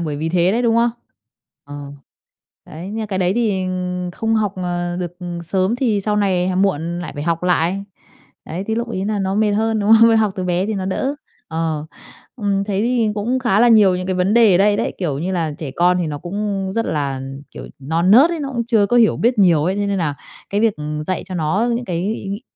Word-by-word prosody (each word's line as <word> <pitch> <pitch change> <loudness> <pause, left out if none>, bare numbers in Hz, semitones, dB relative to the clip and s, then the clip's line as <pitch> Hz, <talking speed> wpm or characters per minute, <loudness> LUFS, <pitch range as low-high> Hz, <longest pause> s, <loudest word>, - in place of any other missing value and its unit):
bởi 155 -4 -3
vì 155 +2 -2
thế 175 +2 +2
đấy, 240 +3 0
đúng 230 -1 +2
không? 235 +1 +3 0.7
Ờ. 145 0 -8 0.8
Đấy, 165 +4 -9
nhưng 220 +2 -4
mà 220 - -3
cái 195 -2 -3
đấy 180 0 +2
thì 210 -6 0 0.5
không 225 +3 -1
học, 210 -3 +1
ờ, 175 -1 -3
được 175 -1 -5 0.3
sớm 190 +6 0
thì 230 -6 +1
sau 210 +1 -1
này 185 -3 +1
h 185 - -1
muộn 175 -3 0
lại 175 -4 -6
phải 145 - -5
học 165 +1 -1
lại. 180 +2 +1 0.6
Đấy, 175 +5 -5
thì 220 - +1
lúc 235 +1 -2
ấy 190 -4 -3
là 210 -1 -1
nó 195 0 -1
mệt 210 0 +2
hơn, 220 +1 +1
đúng 205 +2 +3
không? 230 0 +6
Học 215 -3 +2
từ 185 - -3
bé 180 +1 0
thì 220 - -2
nó 190 -1 -3
đỡ. 265 +8 -1 0.3
Ờ. 160 -2 -2 0.5
Ừm, 200 -3 0
thấy 200 0 -1
thì 235 -1 +1
cũng 225 +5 -1
khá 235 -5 +2
là 240 - +6
nhiều 205 -5 +5
những 185 - -4
cái 185 - -1
vấn 185 +4 +1
đề 225 -5 +6
ở - - +4
đây 205 +1 +4
đấy, - - -2
kiểu 155 -7 -2
như 180 +5 -2
là, 165 -4 -1
trẻ 150 -4 -5
con 180 +1 +3
thì 175 - -1
nó 150 -2 -4
cũng 195 +2 -3
rất 230 - 0
là, 140 -3 -2 0.3
kiểu, - - -9
non 165 +7 0
nớt 270 +10 +7
ấy, 335 -2 -3
nó 280 - -3
cũng 235 -2 -2
chưa 220 -4 +3
có 240 - +1
hiểu 230 -2 +4
biết 240 +1 +1
nhiều 170 -6 +4
ấy, 185 +3 0
thế 205 0 -1
nên 200 -1 -1
là 150 -4 -1 0.4
cái 205 +1 0
việc, 225 -2 +2
ừm, 150 0 -4
dạy 185 +3 -3
cho 185 -1 -8
nó 180 +8 0
những 240 - -4
cái 180 +3 -2
ý 195 - -7
nghĩ 200 +4 -5
195 Hz, 245 wpm, -19 LUFS, 175-220 Hz, 0.8 s, nớt